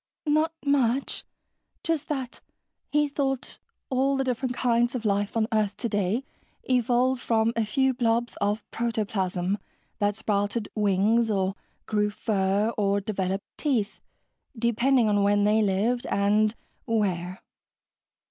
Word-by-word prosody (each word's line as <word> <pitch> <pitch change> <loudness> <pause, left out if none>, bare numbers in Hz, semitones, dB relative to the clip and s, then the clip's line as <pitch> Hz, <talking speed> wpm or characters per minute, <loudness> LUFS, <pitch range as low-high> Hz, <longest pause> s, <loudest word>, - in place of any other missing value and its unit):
"Not 310 +2 +2
much. 270 -2 +1 0.6
Just 320 -3 -1
that 265 -5 -4 0.5
he 295 0 +3
thought 270 -2 -2 0.3
all 270 +1 +2
the 270 - +1
different 250 0 -2
kinds 240 0 +2
of 235 -3 -4
life 205 +1 0
on 220 -1 +2
earth 210 -2 +1
today 210 +1 0 0.4
evolved 250 0 +2
from 225 0 +2
a 230 - +1
few 265 +4 +2
blobs 235 -1 0
of 205 +2 0
protoplasm 205 -4 -1 0.4
that 205 -1 +1
sprouted 205 +1 -1
wings 210 +3 +2
or 195 -2 +1 0.3
grew 210 -1 +1
fur 205 +1 0
or 200 0 +2
developed 195 -1 -2
teeth, 240 -9 -1 0.6
depending 235 +2 +3
on 205 -1 +2
when 205 0 +3
they 210 +1 +4
lived, 215 +5 +1
and 210 +2 +2 0.3
where." 185 -5 -1
220 Hz, 125 wpm, -26 LUFS, 205-250 Hz, 0.6 s, they